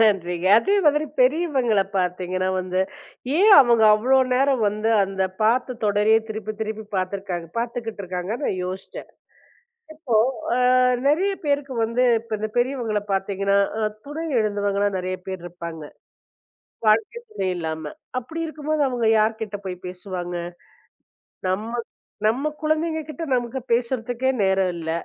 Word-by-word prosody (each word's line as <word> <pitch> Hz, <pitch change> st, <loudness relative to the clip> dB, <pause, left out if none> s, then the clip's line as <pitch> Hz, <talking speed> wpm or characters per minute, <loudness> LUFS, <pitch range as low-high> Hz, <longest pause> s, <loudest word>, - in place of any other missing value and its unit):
நன்றிங்க. 180 Hz, -5 st, +2 dB
அதே 395 Hz, -, +1 dB
மாதிரி 300 Hz, +1 st, +4 dB, 0.2 s
பெரியவங்கள 260 Hz, -, +3 dB
பாத்தீங்கன்னா 185 Hz, 0 st, -1 dB
வந்து, 185 Hz, 0 st, -1 dB, 0.6 s
ஏன் 415 Hz, +3 st, +7 dB
அவங்க 235 Hz, -4 st, +4 dB
அவ்ளோ 255 Hz, +5 st, +3 dB, 0.2 s
நேரம் 265 Hz, -2 st, +2 dB
வந்து 215 Hz, +2 st, -2 dB, 0.2 s
அந்தப் 190 Hz, -1 st, -3 dB
பாத்துத் 245 Hz, +2 st, +1 dB
தொடரையே 210 Hz, +2 st, +4 dB
திருப்பித் 215 Hz, -1 st, -5 dB
திருப்பிப் 220 Hz, -1 st, -5 dB
பாத்துருக்காங்க 185 Hz, -2 st, -3 dB
பாத்துகிட்டு 230 Hz, -3 st, -4 dB
இருக்காங்க. 180 Hz, +2 st, -4 dB
நான் 185 Hz, -, -1 dB
யோசிச்சேன். 185 Hz, +1 st, -7 dB, 0.9 s
இப்போ 305 Hz, -7 st, -3 dB, 0.4 s
அ -, -, +1 dB, 0.5 s
நிறைய 355 Hz, +8 st, +3 dB
பேருக்கு 285 Hz, -2 st, 0 dB
வந்து 230 Hz, +3 st, 0 dB, 0.2 s
இப்ப 225 Hz, -1 st, -4 dB
இந்த 215 Hz, +1 st, -2 dB
பெரியவங்கள 240 Hz, -4 st, 0 dB
பாத்தீங்கன்னா, 195 Hz, +1 st, +1 dB, 0.5 s
துணை 310 Hz, +3 st, -5 dB, 0.2 s
இழந்தவங்க 205 Hz, -2 st, 0 dB
தான் 200 Hz, -1 st, 0 dB
நெறைய 185 Hz, 0 st, -3 dB
பேர் 190 Hz, -2 st, -5 dB
இருப்பாங்க. 170 Hz, -2 st, -7 dB, 1.1 s
வாழ்க்கை 220 Hz, -, +2 dB
துணை 195 Hz, -, -2 dB
இல்லாம. 160 Hz, -2 st, -4 dB, 0.3 s
அப்படி 320 Hz, +7 st, -8 dB
இருக்கும்போது 310 Hz, -1 st, -2 dB
அவங்க 245 Hz, -3 st, -1 dB
யார்கிட்ட 215 Hz, -1 st, -1 dB
போய்ப் 180 Hz, -1 st, -6 dB
பேசுவாங்க? 180 Hz, -1 st, -6 dB, 1.1 s
நம்ம 210 Hz, +5 st, -2 dB, 0.6 s
நம்ம 255 Hz, +7 st, +1 dB
குழந்தைங்ககிட்ட 315 Hz, -1 st, -1 dB
நமக்கு 245 Hz, +1 st, -2 dB
பேசுறதுக்கே 245 Hz, +1 st, 0 dB
நேரம் 190 Hz, -1 st, +2 dB
இல்ல. 160 Hz, -1 st, -3 dB
215 Hz, 125 wpm, -23 LUFS, 190-255 Hz, 1.1 s, ஏன்